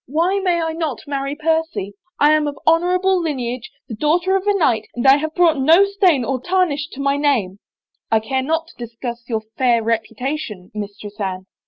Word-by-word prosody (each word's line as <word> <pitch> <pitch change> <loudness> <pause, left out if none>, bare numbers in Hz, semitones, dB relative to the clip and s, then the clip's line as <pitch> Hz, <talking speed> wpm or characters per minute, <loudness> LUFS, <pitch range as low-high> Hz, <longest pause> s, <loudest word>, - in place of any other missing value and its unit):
Why 340 +8 +1
may 360 -3 +1
I 325 -1 -1
not 320 -6 -3
marry 280 -1 -3
Percy? 320 - -1 0.3
I 295 +1 +5
am 305 -1 +2
of 285 -1 -4
honor 340 +3 +3
able 375 0 +2
lineage, 250 -6 -3 0.2
the - - -7
daughter 340 - +1
of 385 +1 -1
a 410 - +4
knight, 230 - +1
and 240 - -3
I 270 +1 +7
have 315 +1 -4
brought 335 -5 +3
no 325 +8 +6
stain 375 - +2
or 255 +1 -2
tarnish 340 -3 0
to 265 - -10
my 280 0 +1
name 235 -10 0
— - - -74
" - - -51
" - - -56
I 220 - +4
care 260 +5 -2
not 320 +4 -1
to 240 - -10
discuss 235 +1 -7
your 220 -2 -1 0.2
fair 240 -3 +3
reputation, 225 -2 -3
Mistress 210 0 -7
Anne." 190 -2 -3
285 Hz, 210 wpm, -20 LUFS, 235-330 Hz, 0.3 s, I